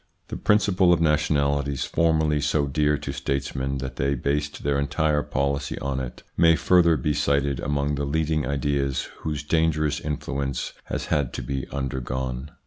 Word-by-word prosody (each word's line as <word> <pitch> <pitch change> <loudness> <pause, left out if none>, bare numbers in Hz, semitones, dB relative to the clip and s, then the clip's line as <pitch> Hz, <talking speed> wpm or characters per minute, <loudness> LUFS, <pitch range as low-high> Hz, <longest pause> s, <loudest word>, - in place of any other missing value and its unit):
The - - -4
principle 100 -3 +3
of 85 - +4
nationalities, 70 -3 +1
formerly 80 -2 +2
so 75 0 +1
dear 75 +1 +1
to - - -5
statesmen 70 0 -2
that 65 0 -6
they 70 +1 +1
based 75 +3 -2
their 70 0 +1
entire 75 +1 +1
policy 70 +1 -2
on 70 -1 -2
it, 65 -2 -7
may 85 -1 +5
further 85 -2 +4
be 75 +3 0
cited 70 -2 +1
among 70 0 -1
the 70 0 -1
leading 75 +1 0
ideas, 70 -1 -1
whose 75 -2 -3
dangerous 75 -1 +1
influence 70 -3 -3
has - - -3
had 70 -5 0
to - - -4
be 70 -1 -3
undergone. 65 0 -3
70 Hz, 155 wpm, -25 LUFS, 70-75 Hz, -, may